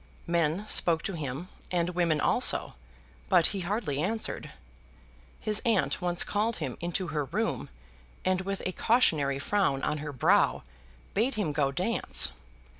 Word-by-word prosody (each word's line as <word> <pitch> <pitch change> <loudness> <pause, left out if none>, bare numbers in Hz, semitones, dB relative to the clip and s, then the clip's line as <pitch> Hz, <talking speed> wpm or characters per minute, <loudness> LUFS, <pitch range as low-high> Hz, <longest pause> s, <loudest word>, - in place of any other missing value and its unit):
Men 170 +4 0
spoke 165 -5 +3
to 195 - -2
him, 150 +1 -4 0.2
and 175 -1 0
women 170 -3 +1
also, - - +1 0.6
but 175 -3 +5
he 200 - -3
hardly 180 -6 -2
answered. 220 +6 -2 0.9
His 215 -1 0
aunt 215 - +1
once 175 -1 +4
called 215 +2 0
him 135 -7 -4
into 175 +1 -2
her 150 -2 -1
room, - - -2 0.6
and 185 0 +2
with 195 +1 -4
a 185 - 0
cautionary 155 - +2
frown 140 -3 0
on 150 - -1
her 150 0 -5
brow, 130 - +3 0.5
bade 235 +5 +1
him 205 -8 -1
go 140 -2 +1
dance. 185 +10 +1
175 Hz, 145 wpm, -29 LUFS, 150-200 Hz, 0.9 s, but